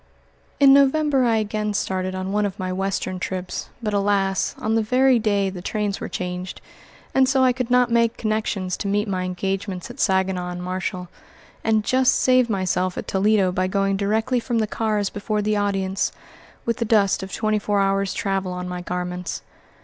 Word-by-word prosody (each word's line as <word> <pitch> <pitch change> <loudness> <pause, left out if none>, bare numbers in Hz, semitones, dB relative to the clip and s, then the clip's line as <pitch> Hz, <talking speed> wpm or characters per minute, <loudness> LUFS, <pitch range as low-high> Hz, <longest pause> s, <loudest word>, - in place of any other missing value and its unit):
In 275 -1 +8
November 280 -1 +4
I 230 -1 +3
again 210 -1 -1
started 185 -1 -2
on 185 +1 -3
one 210 +1 +1
of 200 -1 -2
my 185 -2 -3
Western 185 -1 -2
trips, 185 0 -4
but, 210 -1 -1
alas! 200 -1 +1
on 220 - -1
the 225 - +3
very 255 +3 +3
day 200 -3 +1
the 180 -2 -7
trains 205 0 -2
were - - -4
changed, 180 0 -5 0.5
and 265 -1 +4
so 265 -1 +3
I 255 -1 +4
could 250 -1 -3
not 250 -1 +3
make 230 -1 +2
connections 215 -4 -1
to - - -4
meet 205 +2 0
my 185 -2 -2
engagements 190 +2 -3
at 250 - -14
Saginaw 190 -2 +1
and 180 0 -6
Marshall, 185 0 -3 0.6
and 220 -1 +2
just 255 +3 +3
saved 255 -2 +3
myself 185 -2 0
at - - -5
Toledo 195 -1 +2
by 185 +1 0
going 195 +1 +1
directly 220 +5 0
from 235 0 -2
the 220 - +2
cars 210 -1 -1
before 210 +1 -2
the 210 +1 +1
audience, 195 -2 0 0.5
with 235 - 0
the 240 - 0
dust 210 -3 +3
of 190 0 -7
twenty 215 -1 0
four 205 -1 0
hours' 195 0 +1
travel 195 -2 -1
on 180 0 -5
my 180 0 -5
garments. 180 0 -4
200 Hz, 190 wpm, -22 LUFS, 185-225 Hz, 0.6 s, In